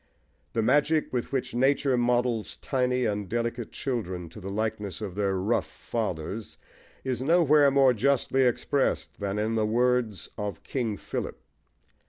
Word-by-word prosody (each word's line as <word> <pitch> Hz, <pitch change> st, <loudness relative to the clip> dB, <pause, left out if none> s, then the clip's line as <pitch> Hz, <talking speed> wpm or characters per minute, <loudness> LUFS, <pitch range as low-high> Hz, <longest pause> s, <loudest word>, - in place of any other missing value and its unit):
The 115 Hz, -, +1 dB
magic 150 Hz, +6 st, +2 dB
with 125 Hz, -2 st, -2 dB
which 135 Hz, -2 st, -2 dB
nature 135 Hz, +2 st, +3 dB
models 120 Hz, -2 st, +1 dB
tiny 125 Hz, -2 st, 0 dB
and 105 Hz, -3 st, -2 dB
delicate 120 Hz, 0 st, -2 dB
children 95 Hz, -, -3 dB
to 85 Hz, -, -11 dB
the 95 Hz, -, -5 dB
likeness 105 Hz, -1 st, -3 dB
of 105 Hz, -4 st, -5 dB
their 100 Hz, 0 st, 0 dB
rough 100 Hz, +6 st, 0 dB
fathers 105 Hz, -1 st, -4 dB, 0.5 s
is 130 Hz, -2 st, -2 dB
nowhere 150 Hz, -1 st, +5 dB
more 135 Hz, -2 st, +5 dB
justly 135 Hz, +3 st, +2 dB
expressed 130 Hz, +2 st, +1 dB
than 100 Hz, 0 st, -2 dB
in 110 Hz, +2 st, 0 dB
the 110 Hz, -1 st, +1 dB
words 120 Hz, -2 st, +1 dB
of 100 Hz, -5 st, -4 dB
King 115 Hz, -6 st, -2 dB
Philip. -, -, -5 dB
120 Hz, 145 wpm, -27 LUFS, 105-130 Hz, 0.5 s, nowhere